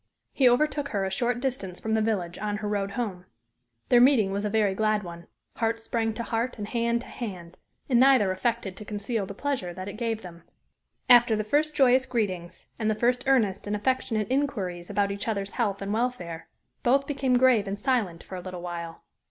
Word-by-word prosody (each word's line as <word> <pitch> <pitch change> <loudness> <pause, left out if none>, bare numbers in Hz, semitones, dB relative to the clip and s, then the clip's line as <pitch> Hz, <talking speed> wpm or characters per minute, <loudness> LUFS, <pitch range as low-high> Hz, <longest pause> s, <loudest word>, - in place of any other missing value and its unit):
He 260 -3 +5
overtook 290 +3 +1
her 200 -7 -1
a 190 - -3
short 240 +4 0
distance 245 -9 -3
from 220 - -2
the 220 - +2
village, 185 -6 -1
on 210 0 -2
her 210 0 -4
road 200 -1 -2
home. 200 -6 -4 0.6
Their 240 -1 +6
meeting 245 -7 +5
was 200 +1 -2
a 210 - 0
very 210 -2 +2
glad 215 +1 +1
one 170 -1 -9 0.3
heart 225 0 0
sprang 225 -1 -2
to 235 - -3
heart 235 +2 -2
and 205 -1 -5
hand 235 0 0
to - - -11
hand 180 -7 -7 0.3
and 245 -3 +3
neither 255 -7 +5
affected 200 0 -2
to - - -8
conceal 210 0 -3
the 200 - -8
pleasure 250 -10 -3
that 185 +1 -6
it 200 - -7
gave 225 -2 -2
them. 170 -2 -10 0.7
After 240 -2 +7
the 215 - -1
first 300 +7 +1
joyous 260 -1 +4
greetings, 185 -8 -3
and 220 -1 0
the 215 - +1
first 245 +3 +1
earnest 225 -8 +2
and 205 - -1
affectionate 225 0 -1
inquiries 195 -11 -1
about 200 0 +1
each 200 +2 -5
other's 200 -3 -2
health 200 -5 -1
and 200 +1 -2
welfare, 215 -9 -3 0.3
both 275 +3 +3
became 270 -3 +1
grave 245 -5 +4
and 195 +1 -3
silent 215 -9 -1
for - - -12
a 185 - -4
little 180 -1 -7
while. 170 -2 -6
215 Hz, 205 wpm, -27 LUFS, 195-245 Hz, 0.7 s, After